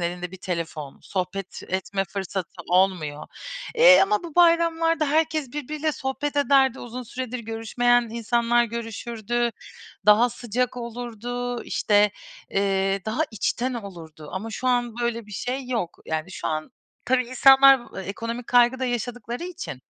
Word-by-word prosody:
elinde 175 +1 -3
bir 190 - -9
telefon, 165 -6 -5
sohbet 190 0 -4
etme 190 +1 -1
fırsatı 190 -1 -5
olmuyor, 175 -5 +1 0.5
eee, - - +8
ama 405 0 +1
bu 335 -3 -9
bayramlarda 335 -2 +3
herkes 310 -3 0
birbiriyle 300 +1 -2
sohbet 285 +2 -3
ederdi, 270 -2 +3
uzun 245 +1 -6
süredir 250 +1 -5
görüşmeyen 235 +2 +1
insanlar 235 +1 +2
görüşürdü, 235 +1 -3 0.6
daha 215 +4 +6
sıcak 245 +1 -2
olurdu, 245 0 -5
işte, 210 0 +3 0.4
eee, 195 0 +1
daha 220 +7 -2
içten 240 +3 -1
olurdu. 165 -8 -9
Ama 210 +4 -4
şu 240 +3 -4
an 245 -2 +1
böyle 235 -2 -2
bir 210 - -12
şey 250 +5 -4
yok. 225 -9 -2
Yani, 160 +2 -3
şu - - -4
an 155 0 -3 0.3
tabii 255 0 +2
insanlar 270 +1 +7 0.2
ekonomik 230 +4 -5
kaygı 245 +1 +4
da 260 - -1
yaşadıkları 245 - -3
için. 360 0 -7
235 Hz, 135 wpm, -24 LUFS, 195-255 Hz, 0.6 s, eee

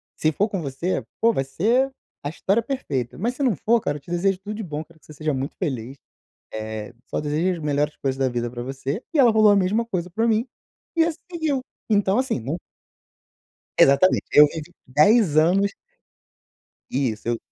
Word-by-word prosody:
se 155 - +1
for 205 +8 0
com 195 -3 -3
você, 150 +5 -2 0.2
pô, 230 +1 +5
vai 135 - 0
ser 230 - +1 0.3
a 145 - -2
história 195 +7 +1
perfeita, 150 - -3
mas 240 +6 -1
se 285 - -2
não 245 -7 +3
for, 230 +9 +2
cara, 145 -7 -2
te 140 - -17
desejo 185 +2 +1
tudo 210 +2 -6
de 220 - -5
bom, 155 -4 -4
quero 165 0 -22
que - - -25
você 155 - -12
seja 155 0 -2
muito 135 +1 -3
feliz, 135 - -3 0.6
eh, 110 0 -5
só - - -2
desejo 160 +4 0
as 155 - -6
melhores 150 +1 0
coisas 135 -1 -2
da 135 -1 +1
vida 120 -1 -2
para 120 0 -6
você". 135 - -4
E 310 - +2
ela 245 -4 +7
rolou 215 -1 +6
a - - +5
mesma 200 +4 +2
coisa 180 -5 -3
para 225 +6 0
mim 225 +2 +2 0.5
e 330 - +5
assim 330 -1 -2
seguiu. 315 -6 -1 0.3
Então, 205 0 +3
assim, 260 - 0
não 135 +9 -3 1.2
Exatamente, 140 +7 +5
eu 150 - +9
vivi 160 +2 -8 0.2
10 155 - +4
anos 190 +6 +3 1.2
Isso 120 -5 -1
eu 120 -1 +1
170 Hz, 195 wpm, -23 LUFS, 140-220 Hz, 1.2 s, eu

